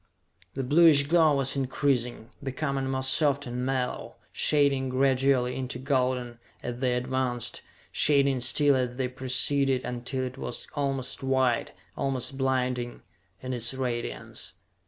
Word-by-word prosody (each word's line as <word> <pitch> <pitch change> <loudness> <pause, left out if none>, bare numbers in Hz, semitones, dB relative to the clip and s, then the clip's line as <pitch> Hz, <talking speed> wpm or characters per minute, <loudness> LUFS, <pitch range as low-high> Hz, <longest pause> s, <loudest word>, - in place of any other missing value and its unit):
The 135 - -2
bluish 150 +1 +6
glow 155 0 +4
was 135 -1 0
increasing, 130 -3 -1
becoming 135 0 -2
more 130 0 -1
soft 140 +1 +3
and 125 0 -4
mellow, 130 -1 -2 0.2
shading 140 -3 +2
gradually 130 -1 +2
into 130 -1 -4
golden, 125 -3 -1 0.2
as 120 0 -5
they 125 -1 +1
advanced 125 -1 -2 0.3
shading 140 -2 +3
still 135 +4 +3
as 125 -2 -1
they 130 0 -1
preceded 130 +1 +1
until 125 +2 -3
it 130 +1 -6
was - - -5
almost 135 -3 -3
white, 130 -3 +1 0.2
almost 135 -1 -2
blinding, 125 -2 -1 0.4
in 130 0 -4
its 120 +1 +1
radiance. 125 -3 -4
130 Hz, 130 wpm, -27 LUFS, 125-140 Hz, 0.4 s, bluish